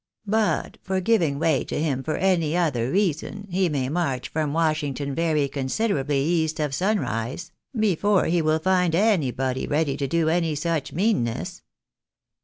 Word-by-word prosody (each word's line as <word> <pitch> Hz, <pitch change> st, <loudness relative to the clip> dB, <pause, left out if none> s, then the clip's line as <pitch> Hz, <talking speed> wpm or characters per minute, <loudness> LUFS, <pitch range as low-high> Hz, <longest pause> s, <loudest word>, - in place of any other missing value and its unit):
But 215 Hz, +1 st, 0 dB
for 190 Hz, 0 st, -1 dB
giving 175 Hz, -8 st, +2 dB
way 155 Hz, -2 st, +2 dB
to -, -, -3 dB
him 145 Hz, -4 st, 0 dB
for 155 Hz, +3 st, -2 dB
any 175 Hz, -4 st, +1 dB
other 130 Hz, -9 st, 0 dB
reason, 200 Hz, +3 st, -1 dB
he 185 Hz, 0 st, +1 dB
may 135 Hz, -4 st, -1 dB
march 135 Hz, -5 st, -2 dB
from 155 Hz, -2 st, -1 dB
Washington 150 Hz, -3 st, -1 dB
very 155 Hz, -2 st, +1 dB
considerably 140 Hz, 0 st, -1 dB
east 160 Hz, -1 st, 0 dB
of 150 Hz, -2 st, -1 dB
sunrise, 140 Hz, -, -1 dB, 0.3 s
before 205 Hz, -1 st, +2 dB
he 170 Hz, 0 st, +2 dB
will 155 Hz, 0 st, +2 dB
find 180 Hz, 0 st, +2 dB
anybody 135 Hz, -, +1 dB
ready 145 Hz, -2 st, 0 dB
to 140 Hz, -, -2 dB
do 165 Hz, +3 st, +1 dB
any 165 Hz, -1 st, +1 dB
such 155 Hz, -1 st, -2 dB
meanness. 180 Hz, -, -1 dB
160 Hz, 150 wpm, -24 LUFS, 140-180 Hz, 0.3 s, giving